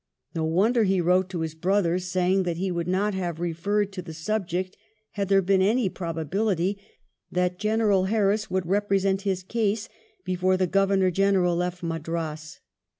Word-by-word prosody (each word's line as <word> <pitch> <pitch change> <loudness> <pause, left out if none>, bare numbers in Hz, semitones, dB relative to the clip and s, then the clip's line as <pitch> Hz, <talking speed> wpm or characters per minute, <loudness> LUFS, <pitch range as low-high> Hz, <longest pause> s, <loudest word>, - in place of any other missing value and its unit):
No 160 -2 -1
wonder 205 +9 +2
he 190 -2 +2
wrote 180 +2 +2
to 175 -3 -4
his 160 -1 -3
brqther 180 +1 +1
saying 185 +1 +1
that 175 -3 -2
he 190 +1 -1
would 170 -1 -2
not 200 +3 +1
have 175 -4 -3
referred 195 +5 -1
to 185 - -5
the 165 -3 -9
subject 185 +1 -2 0.4
had 200 -2 -3
there 195 -1 +4
been 190 +1 +3
any 215 +2 +2
probability 185 +3 -1 0.5
that 180 0 0
General 210 -3 +2
Harris 210 +1 +1
would 190 0 0
repre 200 +2 +1
sent 195 0 0
his 190 -2 -2
case 215 +1 -1 0.4
before 185 0 +1
the 185 - +2
Governor 195 0 +2
General 190 -1 +2
left 180 +1 -2
Madras. 160 -1 -4
185 Hz, 165 wpm, -25 LUFS, 175-200 Hz, 0.5 s, there